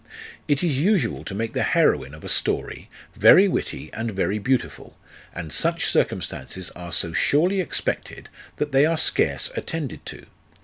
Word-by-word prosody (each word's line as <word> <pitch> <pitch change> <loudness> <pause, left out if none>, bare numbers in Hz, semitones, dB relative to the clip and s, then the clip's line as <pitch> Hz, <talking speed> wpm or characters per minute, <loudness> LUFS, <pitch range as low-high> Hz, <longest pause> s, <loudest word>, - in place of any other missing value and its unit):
It 145 0 +1
is 150 -6 0
usual 180 - +1
to 95 - -5
make 115 +2 -3
the - - -1
heroine 70 +1 +1
of 80 - -15
a - - -7
story - - -1 0.3
very 195 +2 +7
witty 120 - -4
and 115 +2 -3
very 100 0 -1
beautiful, 130 +4 -2 0.4
and 80 -3 -6
such - - +1
circumstances 95 -1 -2
are 85 -1 -9
so 85 0 +1
surely 170 - +2
expected, 180 - -4 0.3
that 150 0 -3
they 135 +3 +4
are 165 0 0
scarce - - +2
attended 160 -5 -5
to. - - -8
125 Hz, 160 wpm, -23 LUFS, -, 0.4 s, very